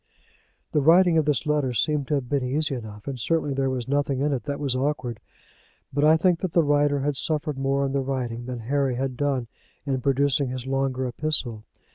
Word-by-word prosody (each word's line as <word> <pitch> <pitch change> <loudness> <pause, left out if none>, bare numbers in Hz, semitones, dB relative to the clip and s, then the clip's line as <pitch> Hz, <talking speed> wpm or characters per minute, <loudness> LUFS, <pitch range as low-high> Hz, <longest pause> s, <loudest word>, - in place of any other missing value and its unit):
The 150 - +2
writing 170 +2 +5
of 155 - 0
this 150 +1 +1
letter 150 -4 +1
seemed 145 +3 +1
to 150 - +1
have 135 -3 -2
been 140 0 0
easy 145 +3 +1
enough, 110 -3 -8
and 135 -2 -4
certainly 155 +2 0
there 135 0 0
was 130 -2 -3
nothing 140 -1 0
in 145 +1 +1
it 125 -5 -3
that 140 0 -3
was 140 -3 -1
awkward; 130 -4 -2 0.7
but 145 +1 +1
I 155 +1 +6
think 175 0 +2
that 185 -4 -3
the 170 - +4
writer 145 -1 +2
had 145 +1 0
suffered 150 -1 -1
more 135 +1 +1
in 135 - -2
the 140 - +1
writing 125 -3 -3
than 125 -2 -5
Harry 135 +2 0
had 130 0 -2
done 135 -2 0 0.4
in 135 -3 -1
producing 140 0 +1
his 130 -1 -5
longer 135 -1 -1
epistle. 120 -4 -2
135 Hz, 210 wpm, -25 LUFS, 130-145 Hz, 0.7 s, I